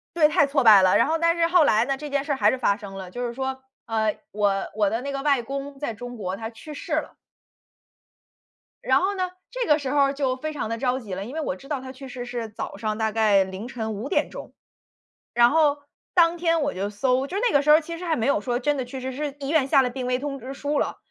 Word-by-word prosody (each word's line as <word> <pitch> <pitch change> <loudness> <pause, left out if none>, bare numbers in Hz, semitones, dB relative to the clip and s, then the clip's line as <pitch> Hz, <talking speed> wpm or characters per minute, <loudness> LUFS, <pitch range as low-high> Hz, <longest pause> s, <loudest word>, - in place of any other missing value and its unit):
对， 305 -3 +5
太 290 -2 +3
挫 275 -1 +1
败 215 -4 +8
了。 185 - +4
然 - - +4
后 325 +1 +1
但 335 +1 +2
是 335 -1 +3
后 350 -3 +5
来 220 -3 +4
呢， 275 +1 -1
这 295 +2 -7
件 280 0 -1
事 290 - -1
儿 - - 0
还 - - +4
是 260 - -1
发 200 -5 +1
生 200 -3 -9
了。 185 -2 -7
就 245 +4 -4
是 235 - -5
说， 265 0 -3 0.3
呃， 220 -2 0
我 200 -1 0
我 210 -2 +3
的 225 +3 -1
那 280 - -4
个 275 0 -3
外 275 -4 +2
公 275 +2 -6
在 280 -5 -3
中 245 +3 -8
国， 190 -3 -4
他 225 +1 -5
去 240 +7 -11
世 290 - -7
了。 - - -2 1.7
然 - - +4
后 395 +2 0
呢， 370 -1 -1 0.3
这 - - -2
个 300 +1 +5
时 275 -3 -4
候 290 - +1
儿 275 0 +4
就 270 -2 0
非 310 +4 -4
常 260 -7 -4
地 230 - -2
着 255 0 0
急 205 -6 -6
了， 195 +2 -5
因 250 +7 -8
为 320 - -2
我 235 -11 -2
知 275 - -15
道 290 -4 -2
他 260 - -8
去 270 +1 -11
世 245 -1 -6
是 240 -2 -4
早 210 - -6
上 215 +1 -3
大 220 -1 0
概 210 -3 +4
凌 190 +4 -6
晨 220 -4 -4
5：00 235 - -1
钟。 - - -9 0.8
然 240 0 +6
后 295 -2 +3 0.4
当 340 -1 +4
天 330 -1 +1
我 285 - -1
就 195 +2 -3
搜 255 +6 +1
就 365 - -5
是 - - -2
那 - - -1
个 285 - +5
时 300 - +2
候 310 +2 +8
其 335 +2 -7
实 360 - -7
还 330 -2 +1
没 230 - -1
有 280 - +2
说 245 +1 -1
真 290 +3 0
的 260 - -2
去 260 +2 -7
世， 260 +1 -4
是 285 +1 -4
医 275 - -4
院 305 -4 +3
下 275 -1 +5
了 250 - 0
病 250 0 -5
危 250 0 +1
通 275 0 -4
知 260 +3 -7
书 285 +1 -2
了。 - - -1
265 Hz, 295 characters per minute, -24 LUFS, 225-290 Hz, 1.7 s, 败